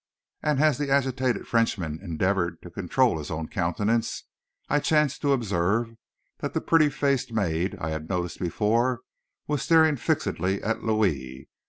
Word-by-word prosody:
And 150 Hz, -3 st, +1 dB
as 155 Hz, -1 st, +3 dB
the 145 Hz, -1 st, -1 dB
agitated 130 Hz, -2 st, +1 dB
Frenchman 95 Hz, -9 st, 0 dB
endeavored 90 Hz, -1 st, -1 dB
to 90 Hz, -, -10 dB
control 95 Hz, +3 st, +1 dB
his 75 Hz, -, -7 dB
own 80 Hz, 0 st, -4 dB
countenance, 105 Hz, +6 st, -1 dB, 0.4 s
I 145 Hz, -, +2 dB
chanced 150 Hz, -1 st, +1 dB
to 145 Hz, -, +2 dB
observe 115 Hz, -1 st, 0 dB, 0.5 s
that -, -, -4 dB
the -, -, +2 dB
pretty 160 Hz, -2 st, +4 dB
faced 140 Hz, -3 st, 0 dB
maid 95 Hz, -4 st, -1 dB
I 80 Hz, -, -3 dB
had 80 Hz, 0 st, -5 dB
noticed 90 Hz, -3 st, -2 dB
before, 115 Hz, +7 st, +1 dB, 0.4 s
was 150 Hz, -2 st, -1 dB
staring 160 Hz, -3 st, +4 dB
fixedly 95 Hz, -4 st, -1 dB
at 110 Hz, +2 st, -1 dB
Louis. 85 Hz, -, -1 dB
110 Hz, 150 wpm, -26 LUFS, 85-135 Hz, 0.5 s, pretty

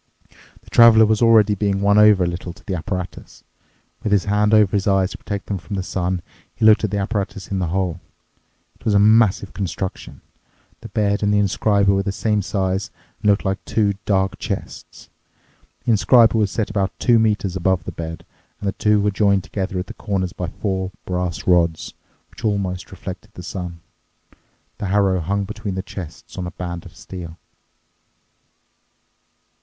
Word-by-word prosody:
The -, -, -17 dB
Traveler 115 Hz, -2 st, +7 dB
was 110 Hz, +1 st, +1 dB
already 110 Hz, -3 st, +5 dB
being 100 Hz, -1 st, 0 dB
won 100 Hz, +1 st, +4 dB
over 105 Hz, -3 st, +6 dB
a -, -, +1 dB
little 85 Hz, 0 st, -5 dB
to -, -, -21 dB
the 95 Hz, -, -3 dB
apparatus. 90 Hz, +1 st, -6 dB, 0.6 s
With 105 Hz, -, -2 dB
his 100 Hz, -2 st, +3 dB
hand 105 Hz, 0 st, +2 dB
over 105 Hz, -3 st, +4 dB
his 100 Hz, 0 st, 0 dB
eyes 95 Hz, -1 st, +2 dB
to -, -, -7 dB
protect 100 Hz, -1 st, -5 dB
them 100 Hz, -2 st, -3 dB
from 85 Hz, +4 st, -6 dB
the 95 Hz, -, -2 dB
sun, 90 Hz, -1 st, -2 dB, 0.3 s
he -, -, 0 dB
looked 110 Hz, 0 st, +6 dB
at 110 Hz, -, +1 dB
the 100 Hz, -, -2 dB
apparatus 100 Hz, -2 st, -3 dB
in 95 Hz, -, -2 dB
the 90 Hz, -, -1 dB
hole. 90 Hz, 0 st, -1 dB, 0.8 s
It -, -, -23 dB
was 110 Hz, -3 st, +1 dB
a -, -, +6 dB
massive 105 Hz, -2 st, +4 dB
construction. 95 Hz, -1 st, -5 dB, 0.6 s
The -, -, -10 dB
bed 100 Hz, -1 st, 0 dB
and 105 Hz, -1 st, +2 dB
the 105 Hz, -, +3 dB
inscriber 100 Hz, 0 st, +2 dB
were 95 Hz, -, +1 dB
the 100 Hz, 0 st, -2 dB
same 105 Hz, +1 st, 0 dB
size 95 Hz, +1 st, -1 dB, 0.3 s
and 105 Hz, -, +2 dB
looked 100 Hz, 0 st, +2 dB
like 95 Hz, 0 st, -2 dB
two 105 Hz, -2 st, +1 dB
dark 95 Hz, -2 st, 0 dB
chests. -, -, -7 dB, 0.7 s
The 120 Hz, -, +2 dB
inscriber 115 Hz, +2 st, +5 dB
was 105 Hz, -3 st, +2 dB
set 110 Hz, +1 st, -2 dB
about 100 Hz, -2 st, -1 dB
two 120 Hz, -2 st, +4 dB
metres 105 Hz, -4 st, 0 dB
above 95 Hz, -1 st, +1 dB
the -, -, -6 dB
bed, 80 Hz, 0 st, -7 dB, 0.3 s
and 100 Hz, -, -4 dB
the -, -, +1 dB
two 105 Hz, 0 st, +2 dB
were 105 Hz, 0 st, +1 dB
joined 100 Hz, -1 st, +2 dB
together 95 Hz, -1 st, -4 dB
at 90 Hz, -, -2 dB
the -, -, -9 dB
corners 95 Hz, -3 st, -3 dB
by 90 Hz, -, -4 dB
four 95 Hz, +2 st, -3 dB
brass 90 Hz, -1 st, -3 dB
rods, 85 Hz, -3 st, +2 dB, 0.4 s
which -, -, -14 dB
almost 100 Hz, -4 st, -2 dB
reflected 95 Hz, +3 st, -9 dB
the 90 Hz, -, -9 dB
sun. 90 Hz, -2 st, -6 dB, 1.0 s
The 100 Hz, -, -3 dB
harrow 95 Hz, -1 st, +2 dB
hung 100 Hz, +5 st, -1 dB
between 100 Hz, -1 st, -5 dB
the 95 Hz, -, -3 dB
chests 90 Hz, -2 st, -9 dB
on 90 Hz, -, -3 dB
a 90 Hz, -, -10 dB
band 85 Hz, -1 st, -5 dB
of -, -, -17 dB
steel. 85 Hz, -3 st, -9 dB
100 Hz, 185 wpm, -21 LUFS, 90-105 Hz, 1.0 s, Traveler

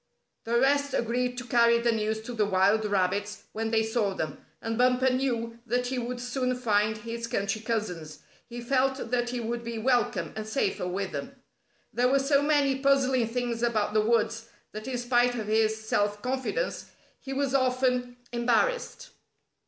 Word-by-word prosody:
The 235 Hz, +1 st, +2 dB
rest 280 Hz, +1 st, +2 dB
agreed 245 Hz, +1 st, -1 dB
to 250 Hz, -, -4 dB
carry 235 Hz, -1 st, +4 dB
the 235 Hz, 0 st, +2 dB
news 220 Hz, 0 st, -1 dB
to 245 Hz, -, -6 dB
the 215 Hz, -3 st, +1 dB
wild 200 Hz, +3 st, +3 dB
rabbits 200 Hz, +1 st, -1 dB
when 225 Hz, +1 st, -2 dB
they 220 Hz, 0 st, +2 dB
saw 220 Hz, -3 st, 0 dB
them, 160 Hz, -, -4 dB, 0.2 s
and 225 Hz, 0 st, -3 dB
Bumper 250 Hz, +2 st, +3 dB
knew 235 Hz, -3 st, -1 dB
that 245 Hz, +2 st, 0 dB
he 255 Hz, 0 st, -2 dB
would 245 Hz, +1 st, -4 dB
soon 255 Hz, +1 st, -1 dB
find 215 Hz, -3 st, +1 dB
his 230 Hz, +1 st, -5 dB
country 210 Hz, -2 st, -1 dB
cousins. 180 Hz, -10 st, -3 dB, 0.3 s
He 240 Hz, 0 st, -6 dB
felt 265 Hz, 0 st, 0 dB
that 240 Hz, -1 st, +1 dB
he 245 Hz, 0 st, -3 dB
would 235 Hz, +1 st, -3 dB
be 235 Hz, 0 st, -5 dB
welcome, 220 Hz, -8 st, +1 dB
and 215 Hz, 0 st, -5 dB
safer 210 Hz, -6 st, -1 dB
with 190 Hz, +1 st, -3 dB
them. 150 Hz, -, -6 dB, 0.6 s
There 245 Hz, +1 st, +3 dB
were 275 Hz, -, +4 dB
so 275 Hz, +1 st, +3 dB
many 285 Hz, -2 st, +2 dB
puzzling 265 Hz, -3 st, +3 dB
things 240 Hz, 0 st, -2 dB
about 220 Hz, -3 st, +1 dB
the 215 Hz, -, +4 dB
woods 225 Hz, 0 st, +1 dB, 0.2 s
that, 215 Hz, +3 st, -7 dB
in 255 Hz, -2 st, -2 dB
spite 245 Hz, 0 st, +2 dB
of 220 Hz, -3 st, -3 dB
his 220 Hz, 0 st, +2 dB
self 205 Hz, -1 st, 0 dB
confidence, 265 Hz, -, -2 dB, 0.3 s
he 270 Hz, -, -8 dB
was 275 Hz, 0 st, -1 dB
often 250 Hz, -2 st, +1 dB
embarrassed. 470 Hz, -, 0 dB
235 Hz, 175 wpm, -28 LUFS, 220-255 Hz, 0.6 s, carry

